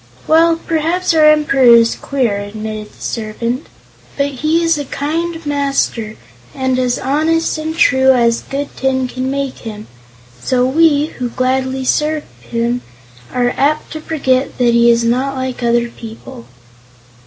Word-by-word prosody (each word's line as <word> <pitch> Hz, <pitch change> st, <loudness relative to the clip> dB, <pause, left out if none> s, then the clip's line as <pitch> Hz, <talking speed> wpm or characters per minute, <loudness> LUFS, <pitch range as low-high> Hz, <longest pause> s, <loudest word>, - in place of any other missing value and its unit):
"Well, 330 Hz, +1 st, +4 dB
perhaps 330 Hz, +3 st, 0 dB
our 315 Hz, -1 st, +5 dB
Emperor 300 Hz, -3 st, +3 dB
is 230 Hz, 0 st, +4 dB
queer," 250 Hz, -7 st, -1 dB
admitted 215 Hz, +1 st, -6 dB
the -, -, -21 dB
servant; 230 Hz, +4 st, -3 dB, 0.5 s
"but 280 Hz, 0 st, +1 dB
he 310 Hz, +5 st, 0 dB
is 330 Hz, -2 st, +2 dB
a 290 Hz, -, -4 dB
kind 325 Hz, +4 st, -3 dB
master 275 Hz, -6 st, -1 dB, 0.4 s
and 260 Hz, -1 st, 0 dB
as 250 Hz, -1 st, 0 dB
honest 315 Hz, +4 st, 0 dB
and 315 Hz, +1 st, -4 dB
true 265 Hz, -1 st, +4 dB
as 235 Hz, -2 st, +2 dB
good 280 Hz, +1 st, -5 dB
tin 260 Hz, -1 st, 0 dB
can 255 Hz, +1 st, -4 dB
make 275 Hz, -1 st, -3 dB
him; 215 Hz, -2 st, -8 dB, 0.5 s
so 250 Hz, -, +1 dB
we, 295 Hz, +1 st, +3 dB
who 245 Hz, -1 st, -2 dB
gladly 260 Hz, +1 st, -1 dB
serve 300 Hz, +3 st, 0 dB, 0.2 s
him, 235 Hz, +1 st, -2 dB, 0.5 s
are 245 Hz, -1 st, 0 dB
apt 300 Hz, +3 st, 0 dB
to 315 Hz, -, -6 dB
forget 270 Hz, -5 st, 0 dB
that 240 Hz, -2 st, +3 dB
he 235 Hz, 0 st, +5 dB
is 235 Hz, 0 st, +3 dB
not 255 Hz, +4 st, 0 dB
like 260 Hz, -1 st, -4 dB
other 235 Hz, 0 st, +1 dB
people." 220 Hz, -, -11 dB
265 Hz, 150 wpm, -16 LUFS, 235-300 Hz, 0.5 s, our